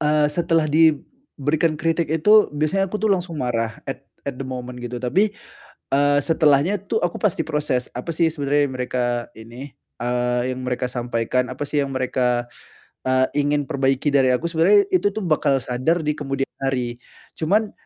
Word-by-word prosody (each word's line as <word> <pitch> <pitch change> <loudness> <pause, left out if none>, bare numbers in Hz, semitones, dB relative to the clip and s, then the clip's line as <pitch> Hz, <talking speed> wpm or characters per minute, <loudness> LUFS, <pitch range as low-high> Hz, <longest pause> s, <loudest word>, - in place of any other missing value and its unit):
eee, 150 0 +3
setelah 165 -1 +1
diberikan 160 - +1
kritik 165 +1 0
itu, 210 +8 +5
biasanya 155 +7 +1
aku, 210 - -3
tuh, 215 - +2
langsung 180 -3 -2
marah 115 -4 -2
at 135 0 -7 0.2
at 140 - -2
the 135 - -4
moment 125 -1 -6
gitu, 120 0 -5
tapi, 190 - +1 0.6
eee, 145 +1 +4
setelahnya, 160 +4 +2
tuh, 220 - 0
aku 175 - -1
pasti 200 -6 +1
proses, 145 -4 -1
apa, 125 +7 -6
sih, 165 0 +2
sebenarnya 145 -1 +1
mereka 125 0 -2 0.3
ini, 120 +5 -10 0.3
eee, 125 0 0
yang 130 - -7
mereka 125 0 -1
sampaikan, 125 +1 -1
apa, 130 - -8
sih, 145 0 0
yang 140 - -2
mereka, 125 -2 0 0.6
eee, 130 0 +3 0.2
ingin 145 0 +1
perbaiki 135 +1 0
dari 135 -2 +4
aku? 170 - -2
Sebenarnya, 175 - +5
itu, 345 - +2
tuh, 220 - -1
bakal 145 -4 +2
sadar 130 +8 0
di 150 - +1
kemudian 135 -2 -3 0.2
hari, 125 -3 -1 0.4
cuman, 205 +6 +1
145 Hz, 165 wpm, -22 LUFS, 125-165 Hz, 0.6 s, itu